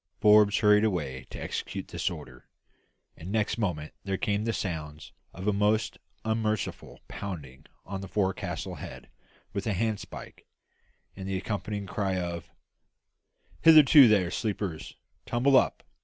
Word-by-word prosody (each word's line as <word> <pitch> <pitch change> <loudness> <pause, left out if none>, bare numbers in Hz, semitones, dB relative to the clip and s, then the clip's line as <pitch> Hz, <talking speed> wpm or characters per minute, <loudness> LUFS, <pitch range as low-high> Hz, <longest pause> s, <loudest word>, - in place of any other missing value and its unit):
Forbes 105 -1 +6
hurried 105 -1 +5
away 70 -11 -2
to - - -8
execute - - -5
this - - -1
order, 60 0 -10 0.7
and 85 +4 -8
next 110 +1 0
moment 80 -8 -2
there 95 -1 -2
came 105 +2 -1
the 115 - +1
sounds 80 -7 -5 0.2
of 95 +3 -7
a 105 - +3
most 105 +2 +1 0.3
unmerciful 110 -2 -2
pounding 75 -10 -7 0.2
on 95 0 -5
the 95 - -7
forecastle 95 -1 -2
head - - -9 0.4
with 100 +1 -3
a 105 - +1
handspike, 110 +1 -4 0.7
and 95 -1 -7
the 95 -1 -1
accompanying 100 +1 -4
cry 95 -1 -1
of 85 -2 -4 1.1
"Hillo 160 -2 +9 0.2
there, 100 -6 +3
sleepers; 100 -7 -3 0.3
tumble 130 +3 +3
up. - - +3
100 Hz, 135 wpm, -28 LUFS, 90-105 Hz, 1.1 s, Hillo